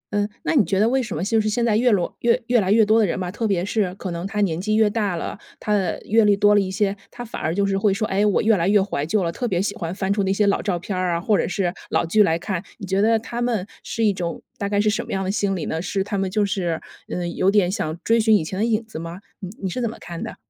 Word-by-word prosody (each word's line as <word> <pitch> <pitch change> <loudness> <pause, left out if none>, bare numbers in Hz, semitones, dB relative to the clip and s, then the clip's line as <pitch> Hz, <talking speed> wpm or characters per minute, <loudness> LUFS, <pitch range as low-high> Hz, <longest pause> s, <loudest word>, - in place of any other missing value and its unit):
嗯， 205 0 +1
那 - - 0
你 275 -8 +5
觉 195 0 0
得 215 - +4
为 265 +2 +2
什 230 -10 -4
么 165 - -2
就 220 +3 +2
是 215 - 0
现 235 +2 0
在 220 -3 +2
越 245 +3 +3
罗 185 -5 0
越 240 +1 +2
越 240 -2 +3
来 190 - 0
越 220 +1 +5
多 220 +2 +4
的 215 - +4
人 175 - -2
吧， 180 -1 -3
特 225 +3 -2
别 185 -3 0
是 200 -3 -1
可 190 -2 -5
能 170 +2 -4
他 210 +1 -2
年 175 -4 0
纪 215 +2 0
越 220 -1 +4
大 205 -3 -1
了， 170 - -5 0.2
他 210 - -1
的 190 -4 -1
阅 225 +2 +4
历 205 -1 +4
多 205 0 +5
了 205 - +5
一 190 - -2
些， 195 +1 0
他 245 0 -8
反 230 - -7
而 160 +2 -1
就 200 +1 +2
是 195 0 0
会 205 0 +3
说， 215 +3 -1
哎， 195 +2 +1
我 210 -2 +3
越 220 0 +4
来 175 -2 0
越 205 +1 +5
怀 190 -7 -1
旧 205 +2 +1
了， 170 - -1
特 245 +8 -3
别 185 -6 0
喜 200 +2 -1
欢 175 -4 -4
翻 195 0 0
出 205 - 0
那 190 -1 +1
些 205 +2 +2
老 200 - +2
照 190 -4 -1
片 180 +3 -5
儿 180 -2 0
啊， - - 0
或 205 +4 +2
者 - - +1
是 185 -1 -1 0.2
老 - - +1
剧 190 +6 +3
来 165 -5 +3
看， 185 0 -4
你 200 - -7
觉 190 +1 +1
得 225 +2 +4
他 235 +2 -5
们 235 -6 0 0.2
是 230 - -3
一 205 - +3
种 175 -3 -4 0.2
大 200 - -2
概 205 0 +1
是 215 - +2
什 210 - +1
么 - - -9
样 190 - -1
的 190 - -1
心 200 -1 0
理 170 - -3
呢？ 160 - -2
是 195 +1 -1
他 200 - -4
们 190 -1 0
就 205 +2 +1
是， 175 -5 -1 0.3
呃， 175 -1 -3
有 185 +2 +1
点 195 -3 +3
想 160 -5 -3
追 230 +1 +3
寻 220 -1 +5
以 - - -2
前 185 +4 -5
的 220 - +2
影 225 -1 0
子 220 -8 -8
吗？ 170 +2 -7 0.2
你 190 -4 -6
你 - - 0
是 190 +7 -3
怎 235 - 0
么 225 - -9
看 170 -1 -8
的？ - - -5
200 Hz, 345 characters per minute, -22 LUFS, 185-215 Hz, 0.3 s, 你